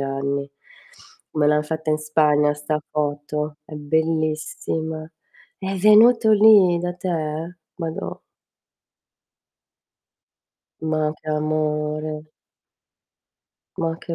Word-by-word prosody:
anni. 140 +1 -2 0.8
Me 150 -1 +1
l'han 150 0 +3
fatta 160 0 -3
in 155 - +1
Spagna 150 -1 +2
'sta 150 +1 -3
foto, 150 0 -3
è 150 - -11
bellissima. 155 +1 -2 0.5
È 195 0 -4
venuto 220 +3 +6
lì 205 -5 +6
da 175 0 -3
te? 165 -2 -4 0.2
Madò. 165 -3 -5 2.6
Ma 155 -1 0
che 155 - -10
amore! 155 0 -2 1.5
Ma 165 -1 -2
che 170 - -6
155 Hz, 90 wpm, -22 LUFS, 150-165 Hz, 2.6 s, venuto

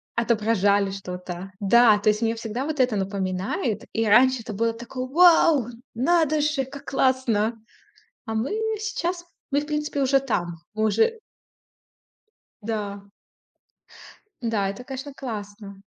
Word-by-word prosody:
отображали 210 -4 +2
что-то. 180 -1 -7
Да. 215 +2 +5
То 215 - +2
есть 210 +2 +1
мне 225 0 +1
всегда 230 +4 -4
вот 305 -2 -4
это 250 -4 +3
напоминает. 195 - -2
И 225 0 0
раньше 245 +3 +5
это 220 -2 -7
было 230 +2 0
такое: 245 +2 -6
"Вау, 325 -4 +5 0.3
надо 310 +4 +2
же, 295 -3 0
как 280 +1 -11
классно!" 235 -4 +1 0.7
А 220 - -4
мы 220 +5 -1 0.3
сейчас, 355 -5 -3 0.3
мы, 285 +1 +2
в 295 - -7
принципе, 300 -1 -2
уже 270 +1 +4
там, 175 -10 -3
мы 215 0 0
уже 450 - +2 1.4
Да. 205 -2 -4 1.4
Да, 215 -4 0
это, 200 +6 -6
конечно, 270 +2 -7
классно. 205 -5 -7
230 Hz, 130 wpm, -24 LUFS, 205-275 Hz, 1.4 s, Да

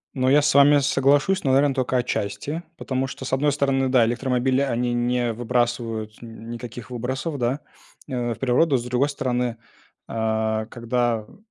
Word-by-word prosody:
Ну, 130 0 +1
я 145 +1 +5
с 150 - +3
вами 145 +1 +7
соглашусь, 140 +6 +2
но, 135 - +2
наверно, 140 0 +4
тока 130 -1 0
отчасти, 120 +6 -2 0.2
потому 130 -2 -2
что, 130 - -8
с 130 - -5
одной 145 +2 +2
стороны, 135 -2 +1
да, 125 -3 +4
электромобили, 130 +2 0
они 120 -2 0
не 120 -1 0
выбрасывают 115 -2 -2
н 115 0 -10
никаких 120 0 -8
выбросов, 130 +5 -3
да, 125 +5 -1 0.5
в 120 -3 -2
природу. 135 +3 +2
С 120 - -4
другой 125 +4 0
стороны, 125 -4 -2 0.5
а 110 -1 -1
когда 120 -1 -1
в 105 - -19
125 Hz, 160 wpm, -23 LUFS, 120-135 Hz, 0.5 s, вами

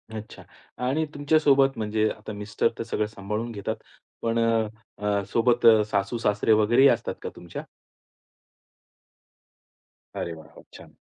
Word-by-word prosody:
अच्छा. 110 0 -9 0.4
आणि 155 +4 +1
तुमच्यासोबत 145 -2 +3
म्हणजे 110 0 0
आता 105 0 -7
मिस्टर 105 +2 -1
तर - - -3
सगळं 110 -2 -1
सांभाळून 105 +3 -4
घेतात 100 -3 -3 0.5
पण 115 0 0
अ, 115 -1 +2 0.3
अ, 100 -1 0
सोबत 120 +1 +2
अ, 110 -2 +8
सासू-सासरे 105 +1 0
वगैरे 120 +5 +4
ही 140 - +8
असतात 115 -2 0
का - - -3
तुमच्या? 85 -1 -8 2.5
अरे, 85 - -3
वाह, 80 -1 -12
वाह! - - -14
छान. - - -14
110 Hz, 135 wpm, -25 LUFS, 105-120 Hz, 2.5 s, अ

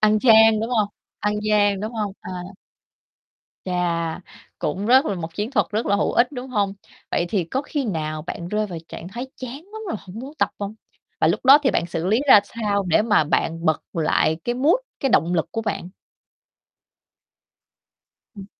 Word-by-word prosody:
Ăn 215 0 +4
chan, 220 -2 +6
đúng 225 +2 -3
hông 215 -4 +2 0.3
ăn 210 0 0
gian, 205 -2 +2
đúng 215 +3 -4
hông? 210 -3 -3
À. - - -8 1.3
Chà, 170 -3 -1 0.4
cũng 185 +7 -2
rất 260 +5 +5
là 200 - -1
một 165 -2 -6
chiến 210 +5 -3
thuật 275 - +2
rất 215 +3 -1
là 200 - +3
hữu - - 0
ích, 245 +4 +3
đúng 255 -1 -6
hông? 200 -4 0 0.4
Vậy 175 - 0
thì 195 -4 0
có 260 - -2
khi 290 -1 -3
nào 155 -7 -3
bạn 170 +1 -6
rơi 210 +2 0
vào 175 -4 -6
trạng 175 - -8
thái 240 +6 -6
chán 255 -1 -7 0.2
lắm 440 0 -7
rồi, - - -2
hổng 190 +3 -10
muốn 265 +4 -7
tập - - +2
hông? 205 +1 -4 0.5
Và - - +4
lúc - - 0
đó 270 +3 +9
thì 265 - +3
bạn 170 - 0
xử 170 0 -3
lý 215 +6 +3
ra 210 - +9
sao 205 -2 -1
để 170 +5 +4
mà 210 -7 +3
bạn 165 +2 -1
bật 160 -3 +2
lại 160 -1 +1
cái 240 - -1
mood, 280 +7 +3 0.3
cái, 270 - +1
động 170 +2 +3
lực 165 - +1
của 225 - -2
bạn? 205 -4 -3 2.5
Ừm. 195 -1 -9
210 Hz, 195 wpm, -22 LUFS, 175-235 Hz, 2.5 s, đó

